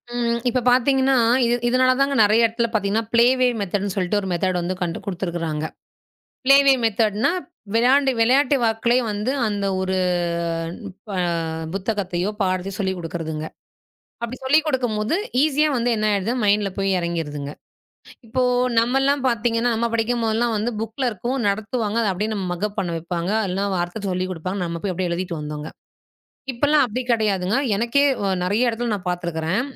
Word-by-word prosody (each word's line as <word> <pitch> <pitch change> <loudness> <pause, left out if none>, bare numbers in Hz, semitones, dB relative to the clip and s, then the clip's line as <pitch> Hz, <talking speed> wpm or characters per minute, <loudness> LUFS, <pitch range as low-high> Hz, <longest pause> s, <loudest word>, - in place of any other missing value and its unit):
ம். 235 -1 0
இப்ப 250 +1 0
பாத்தீங்கன்னா 265 +1 +3 0.3
இ - - +2 0.2
இதனாலதான்ங்க 255 +3 +3
நெறைய 215 +3 +4
இடத்துல 235 +1 -1
பாத்தீங்கன்னா 215 +1 0
ப்ளே 235 0 +6
வே 255 - +4
மெத்தேடுன்னு 200 0 -2
சொல்லிட்டு 195 +1 0
ஒரு 190 - -5
மெத்தேடு 180 +1 0
வந்து 180 +2 -2
கண்டு 170 -1 -2
கொடுத்திருக்காங்க. 170 -5 -3 0.8
ப்ளே 275 +1 +7
வே 275 - +8
மெத்தேடுன்னா 220 +1 +2 0.4
விளையாண்டு 265 +3 +4
விளையாட்டு 270 +5 +4
வாக்லே 225 +2 +2
வந்து 210 +5 -1 0.2
அந்த 205 -1 -2
ஒரு 190 0 -1 1.1
ப - - -7 0.6
புத்தகத்தையோ, 195 -2 -2
பாடத்தையோ 185 0 -1
சொல்லிக் 190 -2 -1
கொடுக்கிறதுங்க. 160 -2 -5 0.8
அப்டி 240 +2 -5
சொல்லிக்கொடுக்கும்போது 260 -5 +1 0.3
ஈசியா 305 0 +3
வந்து 245 0 +1
என்ன 215 0 0
ஆயிடுது 200 +3 0
மைன்ட்ல 205 -1 +2
போயி 195 0 +1
இறங்கிடுதுங்க. 160 -5 -3 0.8
இப்போ 255 +3 -1 0.4
நம்மலாம் 270 +4 +2
பாத்தீங்கன்னா, 235 0 +1
நம்ம 235 +1 0
படிக்கும் 230 +1 0
போதெல்லாம் 225 +1 +1
வந்து 215 +3 -1
புக்ல 225 +4 -3
இருக்கும். 235 +5 -3
நடத்துவாங்க. 220 +2 -1
அத 215 - +1
அப்டியே 210 +4 -2
நம்ம 195 -3 -3
மக்கப் 205 +4 -3
பண்ண 175 - -1
வெப்பாங்க. 170 +2 -3 0.2
இல்லனா 195 +2 -1
வாத்தை 175 +4 -3
சொல்லிக் 185 0 -2
கொடுப்பாங்க. 185 +3 -4
நம்ம 170 0 -5
போய் 195 - 0
அப்டியே 180 0 -2
எழுதிட்டு 170 -1 -3
வந்தோங்க. 150 0 -6 0.8
இப்பலாம் 290 +4 +3
அப்டி 240 +4 -3
கடையாதுங்க. 210 -2 +1 0.2
எனக்கே 235 +6 +2 0.4
நெறைய 215 +7 +2
இடத்துல 235 0 -2
நான் 190 -3 -4
பாத்துருக்கறேன். 175 +3 -1
210 Hz, 145 wpm, -22 LUFS, 185-240 Hz, 1.1 s, வே